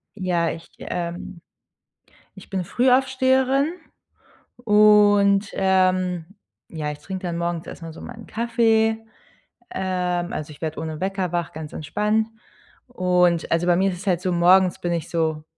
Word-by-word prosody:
Ja, 175 Hz, -4 st, 0 dB
ich 165 Hz, +1 st, -7 dB
ähm, 175 Hz, 0 st, -5 dB, 0.9 s
ich 195 Hz, -, -14 dB
bin 190 Hz, -2 st, -2 dB
Frühaufsteherin 265 Hz, -, +2 dB, 0.9 s
und, 205 Hz, -1 st, +5 dB
ähm, 185 Hz, -2 st, +1 dB, 0.5 s
ja, 150 Hz, -2 st, -4 dB
ich 150 Hz, -, -7 dB
trinke 190 Hz, +5 st, -7 dB
dann 170 Hz, -1 st, -3 dB
morgens 170 Hz, -1 st, -3 dB
erstmal 165 Hz, -2 st, -8 dB
so -, -, -12 dB
meinen 225 Hz, -2 st, -10 dB
Kaffee. 225 Hz, -1 st, +1 dB, 0.8 s
Ähm, 180 Hz, -2 st, -2 dB
also, 155 Hz, 0 st, -5 dB
ich 145 Hz, -, -15 dB
werde 155 Hz, -1 st, -4 dB
ohne 160 Hz, -1 st, -5 dB
Wecker 190 Hz, -2 st, -2 dB
wach, 175 Hz, -1 st, -2 dB
ganz 155 Hz, -1 st, -8 dB
entspannt. 210 Hz, +8 st, -1 dB, 0.6 s
Und, 180 Hz, -6 st, +1 dB
also, 170 Hz, +2 st, +1 dB
bei 175 Hz, -, +4 dB
mir 195 Hz, +2 st, +2 dB
ist 180 Hz, -, -6 dB
es 195 Hz, -, -10 dB
halt 180 Hz, -2 st, +1 dB
so, 185 Hz, -, -1 dB
morgens 180 Hz, +1 st, +4 dB
bin 175 Hz, -1 st, -2 dB
ich 165 Hz, -3 st, -3 dB
so 160 Hz, -2 st, -1 dB
185 Hz, 145 wpm, -23 LUFS, 170-210 Hz, 0.9 s, und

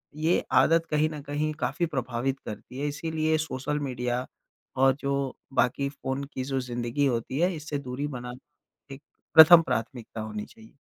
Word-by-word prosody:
ये 160 Hz, +3 st, +1 dB, 0.2 s
आदत 165 Hz, 0 st, +3 dB
कहीं 155 Hz, +1 st, +2 dB
न 150 Hz, -2 st, -7 dB
कहीं 150 Hz, +2 st, -2 dB
काफ़ी 175 Hz, -, 0 dB
प्रभावित 130 Hz, -2 st, -2 dB
करती 125 Hz, +4 st, -8 dB
है। 145 Hz, -, -1 dB
इसलिए 155 Hz, +1 st, 0 dB
सोशल 150 Hz, -1 st, -2 dB
मीडिया 125 Hz, -2 st, -2 dB, 0.5 s
और 135 Hz, 0 st, +4 dB
जो 140 Hz, 0 st, -1 dB, 0.4 s
बाकी 130 Hz, +3 st, +1 dB
फ़ोन 135 Hz, 0 st, -4 dB
की 130 Hz, -, -3 dB
जो 135 Hz, 0 st, -1 dB
ज़िंदगी 120 Hz, +2 st, -1 dB
होती 130 Hz, +1 st, -1 dB
है 180 Hz, +2 st, +2 dB
इससे 150 Hz, -1 st, -4 dB
दूरी 135 Hz, +2 st, -4 dB
बनाना 130 Hz, +2 st, -11 dB
एक 140 Hz, -, -16 dB, 0.3 s
प्रथम 165 Hz, +2 st, +10 dB
प्राथमिकता 115 Hz, -4 st, -4 dB
होनी 105 Hz, -1 st, -5 dB
चाहिए। 110 Hz, 0 st, -17 dB
140 Hz, 160 wpm, -27 LUFS, 125-155 Hz, 0.5 s, प्रथम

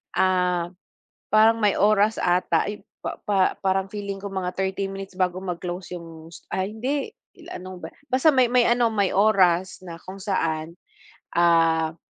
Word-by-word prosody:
ah, 180 Hz, -2 st, +1 dB, 0.6 s
parang 220 Hz, +1 st, +6 dB
may 210 Hz, -3 st, +2 dB
oras 210 Hz, +2 st, +3 dB
ata. 175 Hz, 0 st, +1 dB
Ay, 210 Hz, -, -7 dB, 0.2 s
pa -, -, -5 dB
pa 195 Hz, -2 st, +2 dB
parang 190 Hz, 0 st, +1 dB
feeling 200 Hz, -1 st, -6 dB
ko 200 Hz, -, -5 dB
mga 190 Hz, -2 st, -3 dB
30 195 Hz, +1 st, -2 dB
minutes 195 Hz, -1 st, -8 dB
bago 185 Hz, 0 st, 0 dB
mag-close 180 Hz, 0 st, -5 dB
yung, 165 Hz, -1 st, -11 dB
st 170 Hz, -, -14 dB
ah, 190 Hz, +1 st, -1 dB
hindi, 260 Hz, -, -3 dB, 0.3 s
ila 345 Hz, -1 st, -9 dB
ano 185 Hz, 0 st, -9 dB
ba -, -, -6 dB, 0.3 s
basta 260 Hz, +5 st, +4 dB
may 255 Hz, -2 st, +3 dB
may 250 Hz, -1 st, +4 dB
ano, 240 Hz, -1 st, +3 dB
may 200 Hz, -3 st, 0 dB
oras 190 Hz, -3 st, +3 dB
na 170 Hz, -, -7 dB
kung 190 Hz, +1 st, -9 dB
saan, 165 Hz, -5 st, -2 dB, 0.6 s
ah, 165 Hz, -1 st, +3 dB
190 Hz, 165 wpm, -24 LUFS, 175-210 Hz, 0.6 s, parang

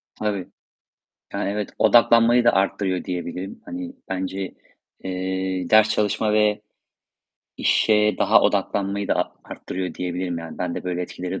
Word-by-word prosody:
Tabii. 100 Hz, -4 st, -2 dB, 0.9 s
Yani, 100 Hz, 0 st, -1 dB
evet, 105 Hz, 0 st, -3 dB
odaklanmayı 120 Hz, +1 st, +5 dB
da 120 Hz, -, +4 dB
artırıyor 95 Hz, -1 st, 0 dB
diyebilirim. 90 Hz, +1 st, -5 dB
Hani, 265 Hz, -2 st, -6 dB, 0.2 s
bence, 95 Hz, 0 st, -4 dB, 0.5 s
eee, 95 Hz, -1 st, -3 dB
ders 110 Hz, 0 st, +6 dB
çalışma 105 Hz, 0 st, +1 dB
ve 105 Hz, -1 st, +2 dB, 1.0 s
işe 105 Hz, -1 st, +3 dB
daha -, -, +5 dB
odaklanmayı 100 Hz, 0 st, 0 dB
da -, -, +3 dB
a -, -, -2 dB
artırıyor 90 Hz, -1 st, -5 dB
diyebilirim 90 Hz, -1 st, -3 dB
yani. 85 Hz, -1 st, -8 dB
Bende 90 Hz, 0 st, -3 dB
böyle 90 Hz, 0 st, -2 dB
etkileri 90 Hz, +1 st, -5 dB
95 Hz, 125 wpm, -23 LUFS, 90-105 Hz, 1.0 s, ders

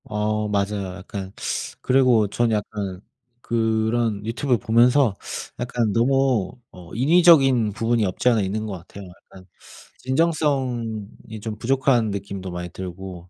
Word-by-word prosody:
어 105 Hz, 0 st, -1 dB
맞아요. 100 Hz, -2 st, -2 dB
약간 95 Hz, 0 st, -7 dB, 0.5 s
그리고 125 Hz, -5 st, +3 dB
전 115 Hz, +3 st, 0 dB
약간 105 Hz, -3 st, -3 dB, 0.4 s
그런 110 Hz, -2 st, 0 dB
유튜브 125 Hz, +3 st, 0 dB
보면서 120 Hz, +2 st, +3 dB, 0.4 s
약간 120 Hz, -2 st, -1 dB
너무 130 Hz, -2 st, +2 dB, 0.2 s
어 90 Hz, -2 st, -13 dB
인위적인 135 Hz, -, +5 dB
부분이 115 Hz, 0 st, +1 dB
없지 95 Hz, +6 st, +1 dB
않아 115 Hz, -3 st, +2 dB
있는 105 Hz, +3 st, -2 dB
것 105 Hz, -, -5 dB
같아요. 95 Hz, +2 st, -10 dB
약간 95 Hz, +1 st, -16 dB, 0.5 s
진정성이 125 Hz, -7 st, -1 dB
좀 110 Hz, 0 st, -5 dB
부족한 125 Hz, -2 st, +2 dB
느낌도 100 Hz, -1 st, -5 dB
많이 90 Hz, 0 st, -5 dB
들고 90 Hz, -1 st, -8 dB
110 Hz, 265 characters per minute, -23 LUFS, 100-125 Hz, 0.5 s, 인위적인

